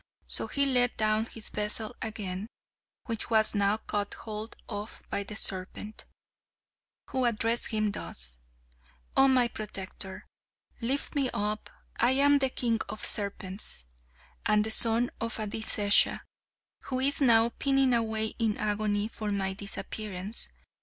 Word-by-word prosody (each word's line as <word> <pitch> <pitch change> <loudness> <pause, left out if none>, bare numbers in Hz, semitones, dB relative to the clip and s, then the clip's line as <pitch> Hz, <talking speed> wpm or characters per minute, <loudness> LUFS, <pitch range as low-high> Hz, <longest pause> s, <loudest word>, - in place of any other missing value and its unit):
So - - 0
he 280 0 0
let 250 -2 +2
down 215 0 +1
his 225 -3 -6
vessel 215 +2 -1
again, 205 -3 -5 0.6
which 225 -1 -3
was 220 -1 +8
now 205 0 +1
caught 205 -2 -4
hold 215 0 -7
of 210 0 -7
by - - -1
the 205 +1 -7
serpent, 200 +1 +3 1.1
who 260 -1 -1
addressed 230 0 +2
him 215 -2 -1
thus: - - -3 0.8
"Oh, 270 - +5
my 255 -2 +3
protector! 195 -3 -7 0.6
Lift 265 +5 -1
me 275 -3 0
up. 210 +1 -3 0.3
I 240 +3 +2
am 285 +1 +3
the 265 -1 0
king 235 -3 -1
of 215 - -4
serpents, 195 - -1 0.6
and 210 0 +2
the 220 - -3
son 230 +2 +7
of 230 0 -3
Adisesha, 210 -1 +3 0.6
who 255 -1 -4
is 280 +3 +2
now 230 -3 +4
pining 270 +1 +1
away 220 -2 -1
in 220 -2 -1
agony 210 0 -2
for 215 -1 -6
my 195 -1 -1
disappearance. 200 +1 -3
220 Hz, 135 wpm, -28 LUFS, 205-235 Hz, 1.1 s, was